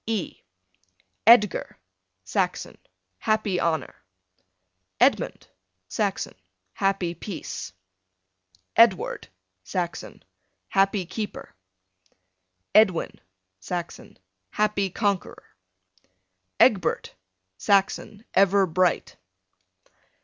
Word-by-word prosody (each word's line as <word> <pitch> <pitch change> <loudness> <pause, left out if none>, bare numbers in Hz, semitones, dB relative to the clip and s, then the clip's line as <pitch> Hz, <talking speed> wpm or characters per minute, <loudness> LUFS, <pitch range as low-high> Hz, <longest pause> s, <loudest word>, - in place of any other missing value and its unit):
E 220 -5 -3 0.9
Edgar, 220 -4 +5 0.5
Saxon, - - -2 0.4
happy 215 -4 0
honor. 160 -2 -1 1.1
Edmund, - - +2 0.4
Saxon, 200 - -2 0.4
happy 195 -3 0
peace. 175 - -7 1.0
Edward, 230 -6 +3 0.4
Saxon, 175 - -5 0.4
happy 195 -1 +2
keeper. 210 +3 -6 1.2
Edwin, 200 -6 +3 0.4
Saxon, 175 - -6 0.3
happy 210 - 0
conqueror. 200 0 -3 1.0
Egbert, 195 -9 +3 0.5
Saxon, 200 +2 +1
ever 195 0 +4
bright. 180 +1 0
195 Hz, 60 wpm, -25 LUFS, 180-210 Hz, 1.2 s, Edgar